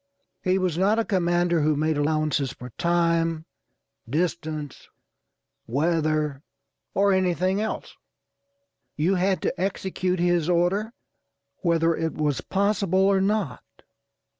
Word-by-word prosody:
He 185 0 +2
was 180 -3 -1
not 205 +4 +3
a 230 - +1
commander 175 -3 +1
who 150 0 +2
made 155 +2 +1
allowances 145 -2 0
for 125 0 -10
time, 165 0 +1 0.6
distance, 155 -2 -3 0.8
weather, 155 +1 0 0.5
or 200 0 +4
anything 185 +1 +1
else. 220 - -4 1.0
You 165 +6 +1
had 190 +1 +1
to 180 - -2
execute 185 -1 -1
his 175 -1 +2
order 185 +6 +1 0.6
whether 165 -2 +2
it 160 0 -2
was 150 -3 0
possible 200 -1 0
or 195 0 +4
not. 195 - 0
175 Hz, 115 wpm, -25 LUFS, 155-190 Hz, 1.0 s, or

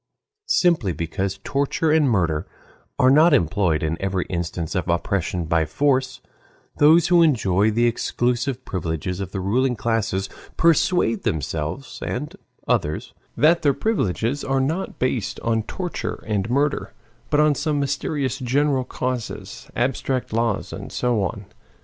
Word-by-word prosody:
Simply 165 - +2
because 90 +5 -3
torture 145 +3 0
and 155 -3 +4
murder 85 -8 0 0.5
are 130 +1 +5
not 155 +2 +6
employed 85 - +1
in 80 +1 -2
every 95 -2 -1
instance 85 -2 -3
of 90 -3 -2
oppression 85 0 -1
by 80 0 +2
force, 130 - 0 0.6
those 160 +3 +6
who 175 -1 +6
enjoy 110 - +3
the 115 +2 +2
exclusive 120 +2 -1
privileges 90 0 -3
of 95 -2 -5
the 95 - -3
ruling 125 +7 +1
classes 110 -4 -1 0.3
persuade 165 - +3
themselves 80 - -3
and 145 +4 -4 0.3
others 75 +1 -1 0.2
that 165 +3 +4
their 145 -4 +2
privileges 135 - -1
are 135 0 0
not 160 +8 -2
based 125 -5 -1
on 115 -1 +1
torture 180 - -5
and 105 -1 -1
murder, 140 +3 0 0.4
but 150 - +2
on 150 0 +5
some 145 +1 -1
mysterious 140 -1 -1
general 135 +1 +1
causes, 125 -3 -5
abstract 130 -1 -1
laws, 115 -2 -1
and - - -7
so 120 -4 0
on. 100 +2 -3
120 Hz, 135 wpm, -22 LUFS, 95-140 Hz, 0.6 s, not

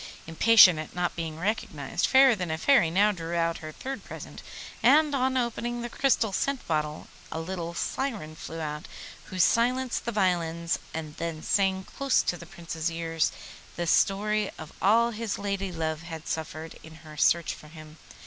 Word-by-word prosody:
Impatient 180 0 +7
at 155 - -7
not 180 0 -1
being 160 -2 -4
recognised, 165 -8 -1
Fairer 265 -1 +6
than 180 -5 -3
a 160 - -1
Fairy 245 - +4
now 200 +5 +4
drew 170 -3 -5
out 165 0 0
her 155 0 -7
third 270 +10 -6
present, - - -9 0.4
and 300 0 +5
on 260 -1 +1
opening 240 0 -2
the 240 - -4
crystal 235 -6 +1
scent 275 +5 -1
bottle 150 -1 -2 0.2
a 160 - -3
little 170 0 -5
syren 210 - -3
flew 165 +1 -7
out, 150 -1 -5 0.4
who 185 - -8
silenced 245 +6 +2
the 235 - -1
violins 170 -5 0
and 155 -2 -6
then 165 -2 -4
sang 190 -1 +1
close 275 +6 +1
to - - -1
the 170 -1 -11
Prince's 170 -1 -4
ear 165 0 -5 0.6
the 175 - -2
story 205 +4 +2
of 155 -1 -10
all 230 +4 +4
his 225 -1 -3
lady 200 -1 -3
love 160 -2 -3
had 165 -1 -8
suffered 160 0 -5
in 160 0 -13
her 155 -1 -11
search 170 +3 +2
for 150 - -13
him. 155 0 -13
175 Hz, 175 wpm, -27 LUFS, 160-225 Hz, 0.6 s, Impatient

